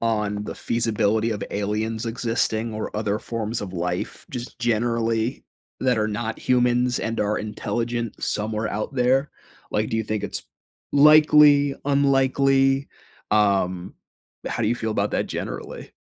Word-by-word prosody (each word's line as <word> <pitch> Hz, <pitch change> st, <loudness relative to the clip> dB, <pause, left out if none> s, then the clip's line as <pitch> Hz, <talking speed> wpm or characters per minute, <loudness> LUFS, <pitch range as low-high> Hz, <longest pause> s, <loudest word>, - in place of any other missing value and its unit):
on 105 Hz, -2 st, -1 dB
the -, -, -6 dB
feasibility 115 Hz, -1 st, 0 dB
of 105 Hz, -, -3 dB
aliens 105 Hz, +3 st, -2 dB
existing 115 Hz, -1 st, -1 dB
or 110 Hz, -, -5 dB
other 105 Hz, -1 st, -1 dB
forms 115 Hz, 0 st, -4 dB
of 95 Hz, -3 st, -6 dB
life 90 Hz, 0 st, -4 dB
just 125 Hz, -1 st, -7 dB
generally, 115 Hz, 0 st, 0 dB, 0.4 s
that 125 Hz, -3 st, +2 dB
are 110 Hz, 0 st, +1 dB
not 110 Hz, +1 st, -3 dB
humans 125 Hz, 0 st, +2 dB
and 115 Hz, 0 st, -2 dB
are 105 Hz, 0 st, 0 dB
intelligent 115 Hz, +2 st, -3 dB
somewhere 110 Hz, +1 st, -1 dB
out 105 Hz, +7 st, -4 dB
there? 130 Hz, +3 st, +2 dB, 0.4 s
Like, 110 Hz, +1 st, -1 dB
do 115 Hz, -, 0 dB
you 110 Hz, -, 0 dB
think 110 Hz, -1 st, -2 dB
it's -, -, -4 dB, 0.5 s
likely, 150 Hz, -1 st, +6 dB
unlikely? 135 Hz, -1 st, +3 dB, 0.4 s
Um, 95 Hz, -4 st, +1 dB, 0.5 s
how 120 Hz, -, -2 dB
do 105 Hz, -, +2 dB
you 120 Hz, -, +2 dB
feel 110 Hz, -1 st, -3 dB
about -, -, 0 dB
that -, -, 0 dB
generally? -, -, -6 dB
115 Hz, 140 wpm, -23 LUFS, 105-125 Hz, 0.5 s, likely